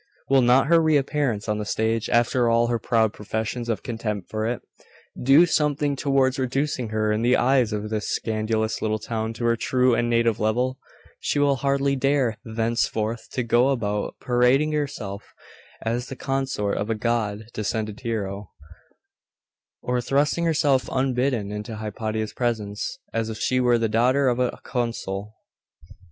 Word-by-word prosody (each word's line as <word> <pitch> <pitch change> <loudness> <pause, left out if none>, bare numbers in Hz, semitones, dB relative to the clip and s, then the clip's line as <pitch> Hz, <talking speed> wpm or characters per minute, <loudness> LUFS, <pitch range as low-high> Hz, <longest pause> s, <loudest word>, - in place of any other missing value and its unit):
'Will 135 -1 +6
not 125 +2 +5
her 165 +2 +5
reappearance 145 -7 +1
on 105 0 -1
the - - -2
stage, 110 +1 -1
after 120 +1 +2
all 115 0 +3
her 120 -1 0
proud 110 -1 +1
professions 110 +3 -4
of 110 -4 -2
contempt 110 -5 -4
for 110 0 -1
it, 120 +1 -3 0.6
do 140 +7 +6
something 150 -3 +1
towards 135 -1 +1
reducing 130 -1 -1
her 110 0 0
in 105 +1 0
the 120 +2 +3
eyes 125 -3 +3
of 105 0 -3
this 105 -1 -2
scandalous 110 0 -1
little 110 0 0
town 110 +1 -3
to 120 +1 -4
her 115 0 +3
true 125 +2 +2
and 120 0 +1
native 115 -2 +2
level? 125 +4 0 0.4
She - - -1
will 140 -1 +3
hardly 140 0 +1
dare 135 -5 +1
thenceforth 115 0 -1
to 125 - -1
go 120 +3 +3
about 105 -6 -1
parading 125 +5 +3
herself 140 -10 -4 0.5
as 120 +2 -2
the 135 - -7
consort 135 -7 -2
of 105 - -3
a 115 - +1
god 110 -2 -1
descended 110 0 -3
hero, 105 -5 -4 1.3
or 125 0 0
thrusting 145 +6 +1
herself 150 -5 +2
unbidden 130 -5 0
into 105 +2 -5
Hypatia's 110 0 -4
presence, 110 - -2 0.2
as 115 -1 -1
if 110 - -5
she 130 +4 +1
were 120 -1 +4
the 115 -1 +1
daughter 125 +5 +3
of 120 0 0
a 125 -1 -1
consul. 110 -4 -3
120 Hz, 160 wpm, -24 LUFS, 110-130 Hz, 1.3 s, Will